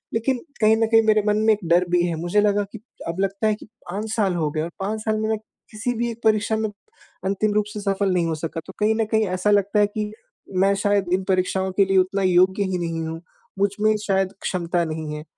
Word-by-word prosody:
लेकिन 250 +3 +1 0.2
कहीं 215 +1 +6
न 225 - +3
कहीं 225 0 +5
मेरे 215 -1 +5
मन 210 0 +3
में 220 - +6
एक 210 - -3
डर 175 +2 +4
भी 175 0 +3
है। 170 - -2
मुझे 175 +4 +2
लगा 205 0 +2
कि 220 - -9 0.3
अब 170 - -4
लगता 195 +2 0
है 215 - +3
कि - - -13 0.2
5 210 +4 -4
साल 195 -5 +1
हो 155 -3 0
गए 155 +1 -2
और 165 - -3
5 210 +3 -2
साल 215 0 0
में 220 0 -1
मैं 220 - +1 0.3
किसी 225 +3 -2
भी 235 +1 0
एक 230 +1 -11
परीक्षा 215 0 +2
में 220 0 -1 0.6
अंतिम 200 +2 +1
रूप 210 -1 +2
से 210 - -5
सफल 195 -1 0
नहीं 175 -2 +1
हो 160 - -1
सका, 165 +1 -4
तो 190 - -9
कहीं 215 +1 +3
न 225 -1 +1
कहीं 220 0 +3
ऐसा 185 +3 0
लगता 205 +1 +2
है 205 - +5
कि 210 0 -4 0.5
मैं 195 0 +4
शायद 205 -2 +2
इन 190 +1 +1
परीक्षाओं 190 0 +1
के 195 - +5
लिए 195 0 +2
उतना 190 +2 +2
योग्य 185 +2 +4
ही 190 -2 -1
नहीं 165 -1 -3
हूँ। 165 +1 -6 0.4
मुझ 200 - +3
में 215 0 +4
शायद 195 -1 +1
क्षमता 175 -1 -1
नहीं 155 -1 -4
है। 150 - -7
200 Hz, 250 wpm, -23 LUFS, 180-215 Hz, 0.6 s, कहीं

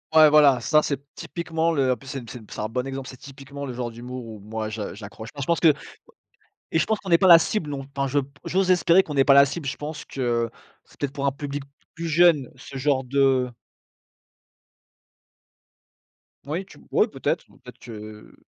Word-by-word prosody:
Ouais 155 -1 +9
voilà 145 -4 +6
ça 155 -1 +3
c'est 140 -3 -2
typiquement 165 -1 -2
le 135 -4 +2
en - - +2
plus 135 - -16
c'est 135 -4 -6
c'est 125 - -8
c'est - - -8
un 105 - -1
bon 125 +3 -3
exemple, 135 -1 -5
c'est 130 - -9
typiquement 140 +1 -9
le 125 - -5
genre 120 -1 -4
d'humour 125 +2 -8
où 110 -2 -9
moi 110 +1 -5
je 110 -3 -5
j'accroche. 110 +2 -9
Moi 140 - -6
je - - -4
pense 170 +2 +1
que 160 -3 +6 1.0
et 160 - +3
je - - +3
pense 220 -1 0
qu'on 195 - -10
n'est 170 -1 +5
pas 190 0 +4
la 170 - +11
cible 165 -2 -2
non. 135 -1 -5
Enfin 140 0 0
je 140 +2 +1 0.3
j'ose 185 0 +2
espérer 180 +1 +4
qu'on 150 - -6
n'est 135 -1 +4
pas 140 - +5
la 140 0 +8
cible 145 +1 -5
je - - -3
pense 150 +1 -6
que 120 -3 -1 0.3
c'est - - -23
peut-être 145 -2 -2
pour 140 0 -2
un - - +3
public 145 +1 -5 0.3
plus 165 0 -4
jeune 160 -5 +4
ce 135 +1 -9
genre 135 -1 +1
de 135 -1 +2 3.0
Oui 165 +7 -3
tu 195 - -16
oui - - +3
peut-être, - - -2 0.2
peut-être - - -13
que 110 -2 -10
140 Hz, 210 wpm, -24 LUFS, 125-155 Hz, 3.0 s, la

